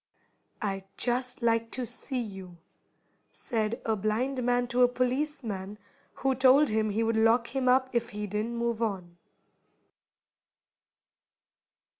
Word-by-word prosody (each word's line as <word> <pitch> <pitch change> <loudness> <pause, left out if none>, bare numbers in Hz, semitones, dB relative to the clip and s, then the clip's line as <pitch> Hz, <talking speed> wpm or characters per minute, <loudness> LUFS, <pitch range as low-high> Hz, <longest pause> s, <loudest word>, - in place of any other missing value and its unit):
"I'd 195 -2 -2
just 250 0 -1
like 230 0 +2
to 255 -1 -2
see 255 +3 -3
you," 190 -4 -9 0.7
said 230 -1 -2
a 220 - +1
blind 230 +6 -1
man 245 0 +2
to 245 +1 +1
a 245 - +8
policeman 245 -6 -2 0.4
who 270 0 +1
told 265 +3 +5
him 215 0 +1
he 215 +2 0
would 225 0 +1
lock 230 +3 +3
him 260 -1 +2
up 260 +1 +4
if 235 -1 0
he 210 0 -5
didn't 210 +4 -3
move 235 -1 -1
on. 185 -6 -3
235 Hz, 130 wpm, -29 LUFS, 215-250 Hz, 0.7 s, a